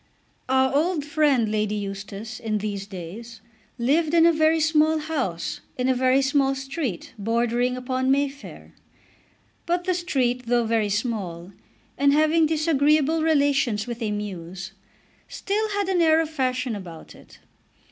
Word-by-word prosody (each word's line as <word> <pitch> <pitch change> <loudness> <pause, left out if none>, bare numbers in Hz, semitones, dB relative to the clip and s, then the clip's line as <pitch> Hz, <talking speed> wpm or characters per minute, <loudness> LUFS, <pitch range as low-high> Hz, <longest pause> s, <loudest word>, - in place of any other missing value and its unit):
Our 265 0 +3
old 315 0 +1
friend 290 -7 +2
Lady 215 -1 0
Eustace, 200 +2 -6
in 220 -2 -2
these 200 -1 -4
days, 210 +5 -9 0.4
lived 300 +7 +1
in 330 -1 +6
a 335 - +5
very 315 +1 +3
small 315 0 +3
house 285 - -3 0.2
in 250 0 0
a 260 - +3
very 255 +2 +2
small 270 0 +2
street 270 - -5
bordering 235 +3 0
upon 255 +1 -1
May 280 +1 +3
Fair; 280 +1 -12 0.9
but 350 +1 0
the 365 0 0
street, 255 -8 -1
though 240 0 +2
very 220 -2 +1
small, 195 -5 -3 0.5
and 280 0 +4
having 310 +2 +3
disagreeable 310 0 +2
relations 280 -8 +2
with 240 -1 -6
a 220 - -1
mews, 190 -3 -6 0.6
still 425 +2 -2
had 405 -1 -1
an 370 -2 +1
air 320 -1 +5
of 320 -1 -1
fashion 255 -4 -1
about 175 -5 -10
it. - - -17
260 Hz, 145 wpm, -24 LUFS, 215-310 Hz, 0.9 s, in